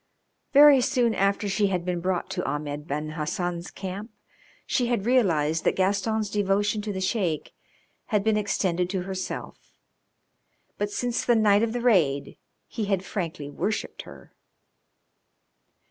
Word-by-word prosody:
Very 285 Hz, -1 st, +8 dB
soon 245 Hz, -3 st, +2 dB
after 200 Hz, +1 st, +1 dB
she 200 Hz, +1 st, +1 dB
had 180 Hz, -3 st, -2 dB
been 180 Hz, -1 st, -1 dB
brought 180 Hz, +1 st, -2 dB
to -, -, -2 dB
Ahmed 145 Hz, +1 st, -4 dB
Ben 150 Hz, +2 st, -3 dB
Hassan's 170 Hz, +3 st, -3 dB
camp 195 Hz, +3 st, -6 dB, 0.6 s
she 245 Hz, -, 0 dB
had 235 Hz, -5 st, -1 dB
realised 165 Hz, -11 st, +2 dB
that -, -, +2 dB
Gaston's 205 Hz, +2 st, 0 dB
devotion 205 Hz, +1 st, +1 dB
to 210 Hz, 0 st, -4 dB
the 190 Hz, -, -4 dB
Sheik 185 Hz, -5 st, -1 dB, 0.5 s
had 210 Hz, -3 st, 0 dB
been 220 Hz, 0 st, +2 dB
extended 185 Hz, -4 st, 0 dB
to 185 Hz, -2 st, -2 dB
herself, 190 Hz, 0 st, -6 dB, 1.0 s
but 205 Hz, -, 0 dB
since 245 Hz, +3 st, -2 dB
the 240 Hz, -, +3 dB
night 210 Hz, -2 st, +4 dB
of 230 Hz, -1 st, +1 dB
the 245 Hz, +1 st, -3 dB
raid 165 Hz, -, +2 dB, 0.3 s
he 220 Hz, -3 st, -3 dB
had 195 Hz, -2 st, -1 dB
frankly 170 Hz, -7 st, -4 dB
worshipped 210 Hz, +9 st, -3 dB
her. -, -, -14 dB
195 Hz, 145 wpm, -26 LUFS, 175-220 Hz, 1.0 s, Very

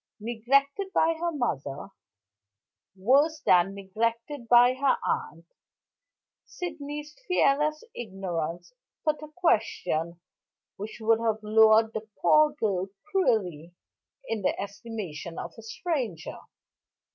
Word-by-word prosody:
Neglected 275 Hz, -, +1 dB
by 325 Hz, +1 st, +4 dB
her 345 Hz, 0 st, 0 dB
mother, 150 Hz, -, -3 dB, 1.1 s
worse 280 Hz, +11 st, +3 dB
than 185 Hz, -, +4 dB
neglected 230 Hz, +6 st, -3 dB
by 245 Hz, +1 st, +7 dB
her 265 Hz, 0 st, +2 dB
aunt, 165 Hz, +2 st, -3 dB, 1.0 s
Sydney's 300 Hz, -3 st, -7 dB
fearless 305 Hz, -3 st, +2 dB
ignorance 185 Hz, -, -5 dB, 0.3 s
put 305 Hz, -1 st, +1 dB
a 305 Hz, -, -7 dB
question 210 Hz, -, 0 dB, 0.6 s
which 210 Hz, +2 st, -7 dB
would 225 Hz, +1 st, +3 dB
have 220 Hz, -2 st, -1 dB
lowered 220 Hz, +1 st, +5 dB
the 220 Hz, 0 st, -6 dB
poor 305 Hz, 0 st, +5 dB
girl 200 Hz, -10 st, -1 dB, 0.2 s
cruelly 180 Hz, -, 0 dB, 0.5 s
in 225 Hz, -2 st, -2 dB
the 185 Hz, -, 0 dB
estimation 200 Hz, -5 st, -6 dB
of -, -, -6 dB
a -, -, -9 dB
stranger. 225 Hz, -, -4 dB
225 Hz, 105 wpm, -27 LUFS, 195-290 Hz, 1.1 s, by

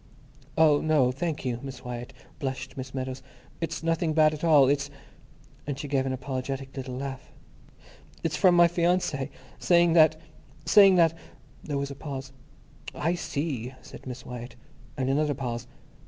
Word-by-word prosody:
"Oh, 155 Hz, -2 st, +5 dB
no, 150 Hz, -5 st, +3 dB
thank 150 Hz, +2 st, -3 dB
you, 120 Hz, -2 st, -1 dB
Miss 130 Hz, -2 st, -8 dB
Wyatt," 120 Hz, -1 st, -6 dB, 0.3 s
blushed 135 Hz, -1 st, -4 dB
Miss 130 Hz, -1 st, -6 dB
Meadows. 130 Hz, 0 st, -4 dB, 0.4 s
"It's 165 Hz, -1 st, -4 dB
nothing 165 Hz, -1 st, +1 dB
bad 155 Hz, 0 st, +5 dB
at 155 Hz, -, -7 dB
all. 150 Hz, -5 st, +6 dB
It's"—and 140 Hz, 0 st, -5 dB
she 145 Hz, -, -5 dB
gave 135 Hz, -1 st, 0 dB
an -, -, -1 dB
apologetic 135 Hz, +1 st, -4 dB
little 130 Hz, -2 st, -5 dB
laugh—"it's 140 Hz, +3 st, -9 dB
from 185 Hz, -3 st, +5 dB
my 175 Hz, 0 st, +7 dB
fiancé 170 Hz, -5 st, 0 dB, 0.3 s
saying 170 Hz, -1 st, +4 dB
that... 160 Hz, -1 st, +5 dB, 0.5 s
saying 195 Hz, -2 st, +7 dB
that—" 165 Hz, -2 st, +5 dB, 0.5 s
There 145 Hz, -2 st, -3 dB
was 140 Hz, 0 st, -3 dB
a -, -, -7 dB
pause. 135 Hz, -2 st, -6 dB, 0.6 s
"I 165 Hz, +3 st, 0 dB
see," 140 Hz, -7 st, -3 dB
said -, -, -12 dB
Miss 125 Hz, -1 st, -7 dB
Wyatt. 120 Hz, 0 st, -8 dB, 0.4 s
And 130 Hz, -2 st, -1 dB
another 145 Hz, +2 st, +1 dB
pause. 120 Hz, -3 st, -4 dB
140 Hz, 150 wpm, -27 LUFS, 130-160 Hz, 0.6 s, my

